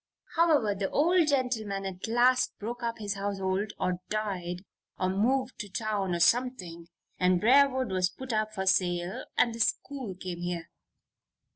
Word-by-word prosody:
"However, 310 -11 +3
the 195 -1 -2
old 340 +2 +3
gentleman 230 -8 0
at 190 +2 -5
last 245 +3 +3
broke 240 +3 -5
up 230 -1 -2
his 205 -2 -3
household, 200 0 -2
or 180 -1 -1
died, 190 -4 -3 0.3
or 185 - 0
moved 255 +7 0
to 205 - -5
town, 200 -3 -1
or - - -2
something, 180 -7 +1 0.3
and 180 -1 +3
Briarwood 260 +1 +4
was 185 -1 +1
put 255 +5 -7
up 215 0 0
for 190 -3 -4
sale 175 -1 +1
and 235 - +3
the 230 - -8
school 250 -2 -1
came 180 -1 -6
here. 175 -1 -4
205 Hz, 155 wpm, -29 LUFS, 185-250 Hz, 0.3 s, Briarwood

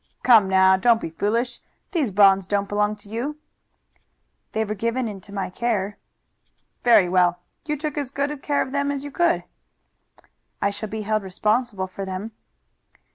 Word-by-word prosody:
"Come 220 -6 +6
now, 190 0 +5
don't 230 +3 +4
be 165 - -5
foolish. 230 +8 -1 0.3
These 315 - 0
bonds 195 -1 +5
don't 200 0 0
belong 210 +1 0
to 205 -1 -14
you." 255 +8 -3 1.1
"They 220 0 0
were 210 - -3
given 230 +4 -1
into 200 -1 -9
my 195 -2 -3
care." 205 -2 -2 0.8
"Very 225 -6 +6
well! 175 -1 +3 0.3
You 300 0 -1
took 300 0 -3
as 280 -3 -3
good 280 +1 -3
care 285 -1 +1
of 260 - -9
them 280 0 0
as 280 -1 -3
you 285 - -7
could." 345 +3 +1 1.2
"I 200 - +1
shall 210 +1 -6
be 220 0 -4
held 215 +1 0
responsible 210 +2 -1
for 190 +1 -7
them." 190 +3 -5
215 Hz, 165 wpm, -23 LUFS, 195-255 Hz, 1.2 s, Come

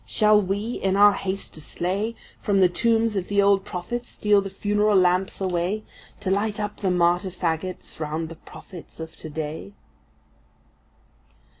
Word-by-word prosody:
Shall 210 - +4
we, 205 +5 -2
in 190 0 +1
our 205 0 +7
haste 195 0 -4
to 155 - -9
slay, 195 +9 -2 0.3
From 200 -2 +2
the 185 -2 +6
tombs 225 +3 +1
of 190 -2 -2
the 200 0 +1
old 200 -1 +4
prophets 240 +7 -5
steal 205 -1 +3
the 195 - -5
funeral 205 +2 +1
lamps 185 +1 +2
away 185 +3 -1 0.4
To 190 - -1
light 205 +2 0
up 210 0 -3
the 195 - -1
martyr 180 +1 +2
fagots 180 -1 -4
round 160 +1 -3
the 165 - -8
prophets 170 +1 -13
of 160 0 -7
to 160 - -8
day? 155 +5 -5
195 Hz, 160 wpm, -24 LUFS, 175-205 Hz, 0.4 s, our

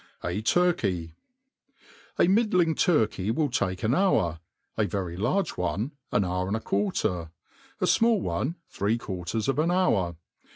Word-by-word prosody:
A 90 +4 -2
TURKEY. 105 - +1 1.1
A - - +5
middling 185 -5 +3
turkey 110 - +1
will 145 +4 0
take 95 -6 -1
an 110 +3 +2
hour; 95 - +2 0.4
a 110 - +1
very 95 -5 -3
large 130 - 0
one, 100 - -1 0.2
an 105 - +2
hour 90 +1 -1
and 100 +3 0
a - - -4
quarter; 95 -5 -1 0.5
a - - +1
fmall 230 -2 +3
one, 130 - -2
three 105 +4 0
quarters 95 +1 -4
of 135 +2 +1
an 160 +2 +2
hour. 110 - +2
110 Hz, 150 wpm, -27 LUFS, -, 1.1 s, A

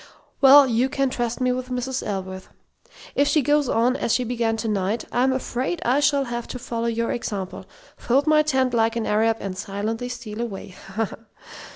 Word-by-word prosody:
"Well, 280 +1 +9
you 250 +1 +1
can 275 -1 0
trust 240 -2 -2
me 255 -1 +2
with 255 0 -3
Mrs. 255 +1 -2
Ellsworth. 190 -2 -5 0.6
If 285 - +2
she 305 -1 +3
goes 290 0 +2
on 240 +3 +2
as 235 - -1
she 245 +2 +2
began 230 -2 -1
to 225 +1 -3
night, 210 +1 -1
I'm 255 +2 +2
afraid 260 +5 -2
I 255 +4 +3
shall 285 -1 +3
have 240 -2 -5
to - - -6
follow 235 -1 -3
your 230 0 -1
example: 195 -5 -4 0.3
'fold 270 +4 +1
my 310 -1 +5
tent 265 -4 +1
like 225 0 +2
an 230 -2 -1
Arab, 225 +1 +2
and 195 -2 -5
silently 215 +5 -4
steal 235 -3 -6
away.' 215 -6 -5 0.3
Ha, 225 +1 +1
ha! - - -9
240 Hz, 195 wpm, -23 LUFS, 225-260 Hz, 0.6 s, Well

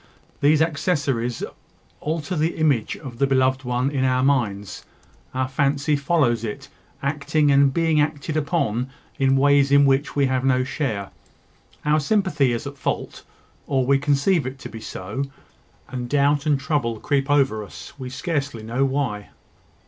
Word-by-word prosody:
These 150 +2 +4
accessories 140 - -1 0.6
alter 160 +3 -3
the 160 +2 0
image 145 -8 +1
of 125 -5 -10
the 140 - +3
beloved 130 0 +2
one 125 +2 0
in 135 -2 0
our 130 0 +2
minds; 110 -8 0 0.5
our 130 0 -1
fancy 140 +2 +1
follows 140 -6 +1
it, 105 -2 -6 0.3
acting 145 +1 +1
and 140 0 +5
being 160 0 +2
acted 150 +1 -2
upon 140 -6 0 0.3
in 135 0 +3
ways 140 0 +4
in 140 0 +6
which 135 +1 +1
we 140 -1 +3
have 130 -1 0
no 130 -1 +3
share. 130 -7 -3 0.7
Our 150 +1 +3
sympathy 150 - +1
is 120 +4 -3
at 140 -1 -8
fault, - - -3 0.5
or 135 -3 +1
we 135 +1 +3
conceive 145 +3 +2
it 130 +1 -6
to - - -7
be 110 - -9
so; 110 +10 -4 0.6
and 125 -1 -5
doubt 145 +1 +2
and 145 -2 +3
trouble 135 -6 -1
creep 140 +2 0
over 135 -7 +2
us, 95 -3 -11
we 130 -1 -5
scarcely 140 - -3
know 120 +5 -1
why. 130 -7 -1
140 Hz, 155 wpm, -23 LUFS, 130-145 Hz, 0.7 s, in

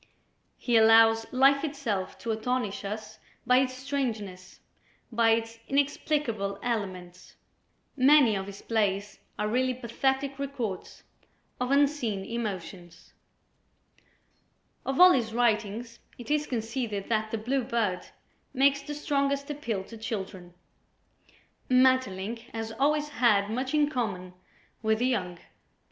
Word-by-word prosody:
He 240 -2 +2
allows 225 0 +5
life 275 +2 +4
itself 270 -11 -3
to 230 - -2
astonish 220 -1 -2
us 215 +1 -6 0.3
by 250 +1 +5
its 260 -1 0
strangeness, 230 -9 -4 0.5
by 230 0 +3
its 225 0 0
inexplicable 275 -7 0
elements. 185 -6 -4 0.6
Many 270 -4 +5
of 195 0 -4
his 200 0 -10
plays 205 -2 -1 0.2
are 210 - -1
really 255 +3 +1
pathetic 265 +3 -1
records 255 -9 -5 0.6
of 250 0 -1
unseen 275 -8 +1
emotions. 190 -6 -6 1.7
Of 270 0 -1
all 365 0 +10
his 230 -7 0
writings, 230 0 0 0.2
it 240 +2 -7
is 300 0 +1
conceded 225 -3 -3
that 220 -1 0
"The 225 - -2
Blue 255 +5 -1
Bird" 220 -7 -1 0.5
makes 275 +1 +3
the 295 +1 -6
strongest 280 -1 -1
appeal 230 -9 -3
to 225 +4 -11
children. 190 -5 -6 1.1
Maeterlinck 255 -5 +2 0.2
has 225 0 -4
always 295 +4 +1
had 215 -7 +2
much 260 +5 -2
in 300 -1 +4
common 205 -10 -3 0.5
with 220 -1 +2
the 245 - 0
young. 185 -9 -1
230 Hz, 120 wpm, -28 LUFS, 210-265 Hz, 1.7 s, all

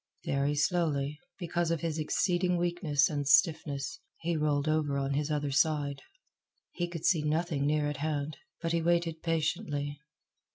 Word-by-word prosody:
Very 140 +1 +1
slowly, 150 -2 0 0.2
because 175 -2 -1
of 165 -3 0
his 160 -1 -2
exceeding 180 +3 +1
weakness 170 -5 +2
and 145 -2 -2
stiffness, 145 -3 +2 0.2
he 170 0 -1
rolled 150 -1 +1
over 155 -2 +1
on 135 0 -1
his 145 +1 0
other 145 -2 -1
side. 145 -1 +1 0.7
He 175 - -2
could 170 -2 -6
see 170 -6 +4
nothing 150 -1 0
near 150 0 +2
at 145 -1 -3
hand, 150 0 -2 0.3
but 165 - 0
he 170 0 +1
waited 170 -1 +1
patiently. 150 -3 -1
155 Hz, 155 wpm, -30 LUFS, 145-165 Hz, 0.7 s, see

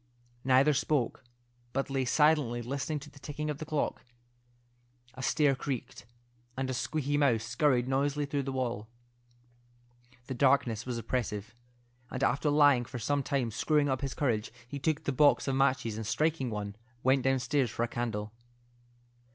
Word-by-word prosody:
Neither 130 +3 +5
spoke, 140 -3 0 0.5
but 135 0 -1
lay 135 -1 0
silently 145 -4 +3
listening 140 +4 -2
to 150 - -11
the 140 - -16
ticking 150 +1 -4
of 145 - -6
the 155 - -6
clock. 155 -2 -1 1.1
A 130 - -8
stair 145 +1 +3
creaked, 130 -4 -5 0.5
and 130 0 -1
a - - -2
squeaky 145 +3 -1
mouse 125 -6 +3
scurried 125 +1 +2
noisily 140 +2 0
through 145 0 -1
the 135 0 -4
wall. 120 -5 -2 1.4
The 130 - -4
darkness 125 -3 +2
was 125 -2 -2
oppressive, 110 -2 -3 0.6
and 130 - -3
after 145 +2 +2
lying 145 -4 +5
for 125 - -7
some 140 +5 0
time 135 -4 -1
screwing 145 +6 +2
up 130 0 0
his 135 -2 -3
courage, 115 -8 0 0.2
he 140 +3 -6
took 150 +2 0
the - - 0
box 145 +2 +4
of 135 - +1
matches, 130 -5 +1
and 110 -1 -4
striking 155 -1 0
one, 105 -2 -4 0.3
went 130 +1 +4
downstairs 135 0 +1
for 115 - -2
a - - +1
candle. 110 -3 -3
135 Hz, 160 wpm, -30 LUFS, 120-145 Hz, 1.4 s, Neither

